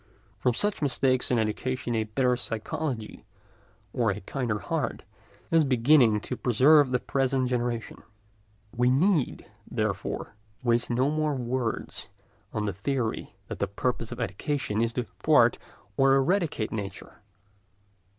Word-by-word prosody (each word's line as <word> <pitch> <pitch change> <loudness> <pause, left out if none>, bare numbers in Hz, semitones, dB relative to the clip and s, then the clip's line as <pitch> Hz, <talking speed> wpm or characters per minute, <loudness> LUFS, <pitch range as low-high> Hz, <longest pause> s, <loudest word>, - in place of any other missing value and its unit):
From 125 -2 +1
such 205 - 0
mistakes 130 -2 +1
in 125 - +2
education 120 +3 -1
a 110 -1 0
better 125 +3 +1
psychology 120 +1 -4 0.7
or 115 -3 +1
a 100 +1 -2
kinder 120 0 -2
heart 95 - -3 0.5
is 165 -1 +5
beginning 125 -4 +4
to 125 - -4
preserve 135 +5 +5
the 125 - +2
present 130 -1 0
generation; 120 -2 -2 0.7
we 125 +1 +3
need, 155 +2 +2 0.2
therefore, - - -3 0.3
waste 120 -1 +2
no 130 +4 +2
more 155 -1 0
words 125 -2 -3 0.4
on 105 -1 -2
the 100 - -1
theory 115 +4 -3
that - - -6
the 100 - 0
purpose 115 +3 -2
of 120 - -6
education 115 - -2
is 115 0 +1
to 125 - -1
thwart - - +3 0.4
or 135 0 +5
eradicate 145 - +1
nature. 100 -3 -7
125 Hz, 130 wpm, -27 LUFS, 115-135 Hz, 0.7 s, is